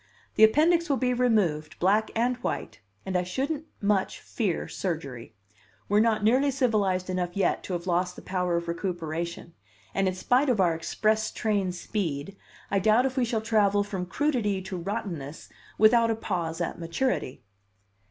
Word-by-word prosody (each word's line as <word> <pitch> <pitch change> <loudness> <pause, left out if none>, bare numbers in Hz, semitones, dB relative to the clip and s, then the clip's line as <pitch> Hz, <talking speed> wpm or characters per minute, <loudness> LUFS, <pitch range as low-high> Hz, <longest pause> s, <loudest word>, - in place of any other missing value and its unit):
The 220 - +4
appendix 330 +9 +4
will 275 - +2
be 250 -1 +1
removed, 185 -11 +1
black 205 +4 +2
and 240 +2 +1
white 245 - -4 0.3
and 190 -1 -3
I 180 - +3
shouldn't 275 - -3 0.2
much 200 -2 +1
fear 200 -8 -2
surgery. 140 - -5 0.5
We're 205 +1 +3
not 220 -1 +2
nearly 260 +6 +4
civilized 215 -9 +1
enough 180 0 -2
yet 200 - +1
to 185 - -4
have 175 0 -3
lost 180 0 0
the - - -11
power 180 -2 0
Of 170 0 -4
recuperation, 170 -1 -4 0.4
and 195 0 +1
in 185 - -1
spite 250 +9 +2
of 240 -5 +2
our 175 -3 +4
express 215 +6 0
train 205 -5 0
speed, 175 -3 -3 0.4
I 200 - +3
doubt 220 +6 +4
if 260 -1 -1
we 255 -3 +2
shall 225 -1 -1
travel 205 -2 +2
from 190 -3 -4
crudity 235 -6 0
to 190 0 -5
rottenness 170 -5 -5 0.3
without 230 +2 +5
a 225 - +1
pause 175 -6 -3
at 170 - -3
maturity." 165 - -2
200 Hz, 165 wpm, -27 LUFS, 175-230 Hz, 0.5 s, without